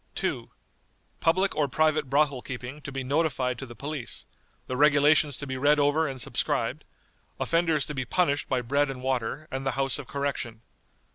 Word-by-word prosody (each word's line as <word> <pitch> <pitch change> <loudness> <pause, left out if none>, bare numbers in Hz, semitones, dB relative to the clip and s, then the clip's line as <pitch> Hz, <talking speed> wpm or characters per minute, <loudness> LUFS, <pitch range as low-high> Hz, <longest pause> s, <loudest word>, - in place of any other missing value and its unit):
"2. - - -2 0.7
Public 185 +4 +2
or 150 -1 +2
private 155 0 +1
brothel 140 -2 +2
keeping 130 +3 -7
to 140 - -7
be 135 -1 -3
notified 130 -3 0
to 135 - -6
the 120 - -11
police; 140 -3 -5 0.4
the 130 - -4
regulations 145 0 +4
to 140 - -6
be 130 -1 -4
read 145 +2 +4
over 145 +3 +3
and 135 -1 -5
subscribed; - - -1 0.6
offenders 165 -4 +2
to 150 - -5
be 130 -2 -2
punished 145 +2 +1
by 130 -1 +1
bread 140 +4 +1
and 130 -1 -6
water, 130 +3 -2
and 135 +1 -3
the 135 - 0
House 135 -1 +1
of 140 - -8
Correction. 140 -5 -3
140 Hz, 180 wpm, -27 LUFS, 130-150 Hz, 0.7 s, regulations